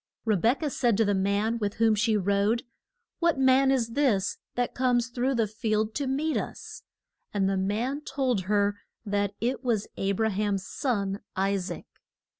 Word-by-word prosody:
Re 220 -2 +3
bek 230 - +2
ah - - +1
said 240 -6 +1
to 225 - +3
the 205 - +2
man 200 +4 +1
with 205 -2 -2
whom 225 0 +3
she 215 +1 +2
rode, 200 +4 +1 0.6
What 340 -4 +2
man 265 0 +4
is 250 -4 +2
this 230 -6 +1 0.2
that 245 0 -1
comes 245 -2 +1
through 250 +2 0
the 230 -2 +2
field 215 +1 -1
to 280 +1 -2
meet 295 +4 0
us? - - -6 0.5
And 195 -1 +2
the 195 - +1
man 220 +9 -1
told 260 -9 -1
her 205 0 +1 0.3
that 200 -1 -1
it 250 +2 -1
was 225 -5 0
A 195 0 0
bra 220 +3 +1
ham's 200 -2 -1
son, 200 -7 -1 0.2
I 195 +1 +1
saac. 190 -1 -4
220 Hz, 180 wpm, -27 LUFS, 200-250 Hz, 0.6 s, man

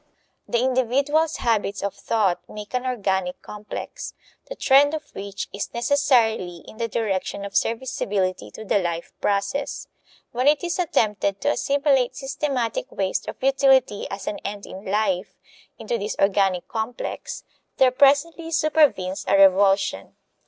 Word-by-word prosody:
The 240 - 0
individual's 270 +5 +1
habits 205 -4 0
of 200 - -1
thought 200 -6 0
make 210 +1 -9
an 250 0 -1
organic 190 -7 -1
complex, 210 0 -7 0.3
the - - -5
trend 285 +3 +4
of 305 -1 -9
which 200 0 -5
is 200 - -4
necessarily 235 - +2
in - - -12
the 230 0 -1
direction 200 -3 -2
of 200 - -8
serviceability 205 -6 -1
to 220 - -10
the 205 - +2
life 170 -2 -3
process. 200 +8 -1 0.4
When 250 +3 0
it 295 +2 +4
is 350 +1 -2
attempted 210 - +1
to 290 - +2
assimilate 275 -4 +1
systematic 270 -4 -2
waste 190 -1 -2
or - - -3
futility, 265 -4 +3
as 195 +1 -6
an 205 - -3
end 200 0 -6
in 190 +2 -10
life, 195 -2 -1 0.4
into 230 +1 -3
this 205 +2 -3
organic 195 -2 +2
complex, 225 +2 -5 0.3
there 260 -1 +5
presently 290 +5 +3
supervenes 300 - +2
a 195 +1 +4
revulsion. 195 - +3
220 Hz, 140 wpm, -23 LUFS, 195-270 Hz, 0.4 s, there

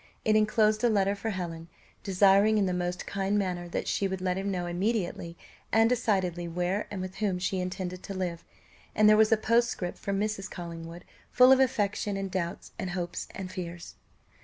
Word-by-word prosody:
It 215 - +4
enclosed 215 0 +3
a 240 - +5
letter 200 -2 +2
for 205 +2 -4
Helen, 170 -4 -5 0.3
desiring 200 +2 +4
in 205 - +3
the 185 - 0
most 180 0 -2
kind 200 +1 -1
manner 180 -3 -2
that - - -3
she 200 - 0
would 190 -1 -4
let 185 0 -1
him 195 +1 -2
know 180 -2 -2
immediately 175 -2 -2 0.3
and 225 0 +5
decidedly 190 -8 0
where 180 +4 -1
and 200 -2 -5
with 185 0 -6
whom 200 -4 0
she 185 +1 -1
intended 185 0 -4
to 195 - -7
live; 175 -3 -3 0.5
and 215 0 +5
there 215 - +7
was 220 0 +4
a 225 - +5
postscript 230 -5 0
from 200 -1 -2
Mrs. 210 -2 -2
Collingwood 170 0 -8 0.3
full 255 +1 +7
of 265 - +7
affection, 210 -5 0
and 195 -1 -4
doubts, 175 -2 -4
and 190 - -3
hopes, 175 -1 -4
and 190 -1 -6
fears. 175 -2 -7
190 Hz, 190 wpm, -28 LUFS, 180-210 Hz, 0.5 s, there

